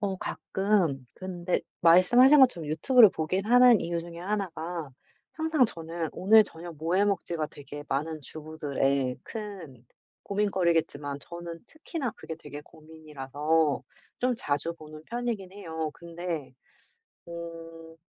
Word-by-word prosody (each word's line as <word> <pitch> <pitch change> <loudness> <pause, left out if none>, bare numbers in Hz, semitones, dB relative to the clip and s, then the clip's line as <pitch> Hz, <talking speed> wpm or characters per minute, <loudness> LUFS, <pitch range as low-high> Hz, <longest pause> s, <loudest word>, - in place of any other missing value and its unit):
어 195 -2 -1
가끔 185 -10 0
근데 180 -1 -2 0.2
말씀하신 240 - +7
것처럼 175 - +4
유튜브를 220 - +6
보긴 185 +5 -2
하는 245 -1 +7
이유 170 0 -2
중에 170 0 -9
하나가 175 -5 -3 0.4
항상 315 -4 +2
저는 165 -4 -3
"오늘 215 +3 +6
저녁 170 -3 -10
뭐 165 +4 -1
해 200 - +4
먹지?"가 170 -5 -1
되게 145 +1 -10
많은 155 +3 -2
주부들의 140 -4 -2
큰 180 - -8 0.4
고민거리겠지만 170 -8 0
저는 170 +1 -8
특히나 310 -5 -5
그게 160 - -7
되게 145 -2 -9
고민이라서 155 -1 -2 0.4
좀 250 0 +2
자주 155 +1 -1
보는 155 -1 -12
편이긴 235 -6 -3
해요. 160 -6 -4
근데 170 -5 -6 0.7
어 165 -1 -9
170 Hz, 275 characters per minute, -28 LUFS, 155-200 Hz, 0.7 s, 말씀하신